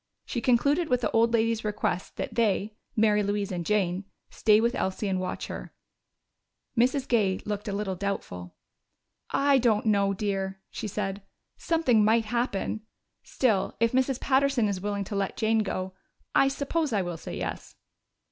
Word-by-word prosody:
She 240 - -3
concluded 280 +8 +2
with 250 -1 +2
the - - 0
old 230 +1 +3
lady's 230 -1 +1
request 205 -3 -2
that - - -4
they 215 -2 +1 0.2
Mary 215 -1 +4
Louise 205 -1 -1
and 175 -2 -2
Jane 190 -1 0 0.3
stay 215 -1 +4
with 235 +2 +2
Elsie 190 +2 -2
and 190 -1 0
watch 185 - -3
her. - - -8 1.0
Mrs. 260 +3 +2
Gay 200 -6 +2
looked 210 0 -4
a - - -1
little 200 -1 -2
doubtful. 90 - -4 0.7
"I 280 -1 +3
don't 225 -3 +2
know, 200 -2 +3
dear," 195 -1 -2
she 220 - -4
said. 195 0 -3 0.4
"Something 265 -10 +2
might 225 +1 +3
happen. 220 -2 -1 0.4
Still, 220 -7 0
if 230 0 +3
Mrs. 260 0 +1
Patterson 270 -4 +2
is 195 -2 -2
willing 205 0 -2
to 200 - -6
let 195 -1 -2
Jane 220 0 +2
go, 190 -3 -2 0.4
I 275 - +5
suppose 280 +2 -1
I 205 -4 +1
will 175 -1 -4
say - - -7
yes." - - -5
215 Hz, 165 wpm, -27 LUFS, 195-240 Hz, 1.0 s, I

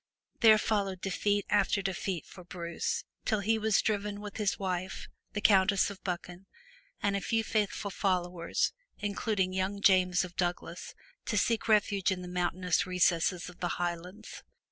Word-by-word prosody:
Then 220 -2 +7
followed 200 -3 0
defeat 205 +2 0
after 205 -1 +2
defeat 185 -3 -2
for 180 - -12
Bruce, 170 -1 -3 0.2
till 215 -3 0
he 220 +2 +1
was 220 -1 +2
driven 205 -1 -1
with 205 -1 -7
his 210 -3 0
wife, 185 -1 -3 0.3
the 205 - -2
Countess 195 -1 +4
of 195 - -12
Buchan 180 0 -5 0.6
and 200 -1 +2
a 200 - -1
few 225 +2 0
faithful 210 -2 -1
followers, 180 -3 0 0.2
including 200 -2 -1
young 190 +2 -1
James 185 -3 +4
of 175 -1 -12
Douglas, 175 -1 -3 0.3
to 210 - -1
seek 225 +3 +1
refuge 205 -3 +3
in 180 -1 -3
the - - -7
mountainous 180 +1 0
recesses 180 -1 +2
of 180 -1 -12
the 175 - -2
Highlands. 175 +4 -5
190 Hz, 155 wpm, -30 LUFS, 180-205 Hz, 0.6 s, Then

